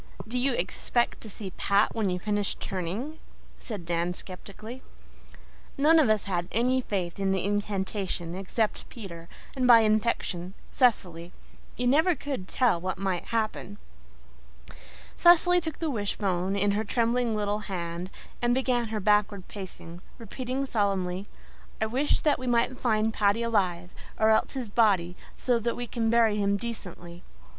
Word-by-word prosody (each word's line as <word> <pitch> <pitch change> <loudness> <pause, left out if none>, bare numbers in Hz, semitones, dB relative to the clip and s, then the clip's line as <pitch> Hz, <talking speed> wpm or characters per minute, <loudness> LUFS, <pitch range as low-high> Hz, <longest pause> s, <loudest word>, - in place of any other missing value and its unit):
"Do 250 +3 -2
you 265 +1 +1
expect 235 +4 -1
to 220 - -8
see 195 -1 -6
Pat 200 +1 +2
when 215 -4 0
you 180 - -1
finish 205 +1 -1
turning?" 200 - -4 0.4
said 205 -7 -6
Dan 170 +1 0
skeptically. 210 +7 -8 1.0
None 315 +4 +5
of 285 -8 +4
us 215 -1 +2
had 175 -3 -2
any 255 +3 +2
faith 185 -6 -3
in 195 -1 +1
the 190 -1 0
incantation 195 -3 -2
except 195 +4 -2
Peter, 170 -8 -9 0.3
and, 255 -2 +1
by 235 -2 +9
infection, 215 -4 0 0.2
Cecily. 180 - +1 0.5
You 245 - -1
never 315 +8 +4
could 270 -9 -5
tell 235 -9 +2
what 185 0 -3
might 190 -2 -2
happen. 215 -3 -2 1.4
Cecily 355 +1 +6
took 320 -2 -4
the 320 -3 -2
wishbone 195 -4 -1
in 200 +1 +2
her 210 +2 0
trembling 235 +1 +1
little 205 0 -1
hands 175 -1 -4 0.3
and 240 0 +2
began 250 -3 +1
her 215 0 -3
backward 210 -1 +2
pacing, 180 -3 -8 0.2
repeating 255 +4 -4
solemnly, 195 -5 -1 0.5
"I 220 - +1
wish 260 +7 +1
that 300 -2 +2
we 255 - -5
may 235 -1 +3
find 220 -3 +1
Paddy 210 +2 +2
alive, 185 -6 0 0.3
or 220 0 +5
else 220 - +2
his 260 -4 -3
body, 200 -5 +2 0.2
so 245 -2 +1
that 235 +1 -1
we 245 - -4
can 230 -1 -1
bury 225 -2 +4
him 200 0 +1
decently." 180 -6 -7
210 Hz, 150 wpm, -27 LUFS, 190-240 Hz, 1.4 s, by